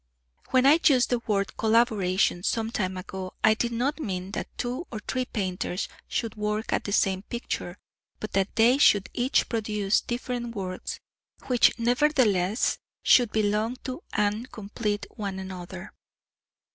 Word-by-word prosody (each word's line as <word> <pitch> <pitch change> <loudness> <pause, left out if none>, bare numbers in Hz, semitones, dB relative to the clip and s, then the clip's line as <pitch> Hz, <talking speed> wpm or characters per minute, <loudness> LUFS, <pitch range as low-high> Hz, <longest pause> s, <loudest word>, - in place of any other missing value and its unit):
When 260 0 +3
I 300 +4 +7
used 260 -4 +4
the 245 - +2
word 200 -2 0
"collaboration" 215 -6 +2
some 225 +4 -1
time 190 -4 -2
ago 185 0 -7
I 220 - +6
did 235 +2 -1
not 260 +7 -1
mean 190 -7 -4
that - - -4
two 255 +8 -3
or 220 - -5
three 255 -1 -1
painters 185 -4 -3 0.2
should 230 -2 -2
work 210 0 -2
at - - 0
the 200 - -3
same 190 -2 +2
picture, 205 -4 -5 0.4
but 215 - -6
that 195 0 0
they 240 +4 +5
should 205 -8 +4
each 250 +2 +1
produce 210 -3 0
different 240 -1 -4
works 185 -2 -5 0.5
which 245 -2 +4
nevertheless 235 -5 +2 0.2
should 240 -4 +5
belong 215 +2 +1
to 255 +5 -5
and 210 +4 -1
complete 210 -1 -3
one 200 -3 -3
another. 185 -1 -8
215 Hz, 145 wpm, -26 LUFS, 195-240 Hz, 0.5 s, I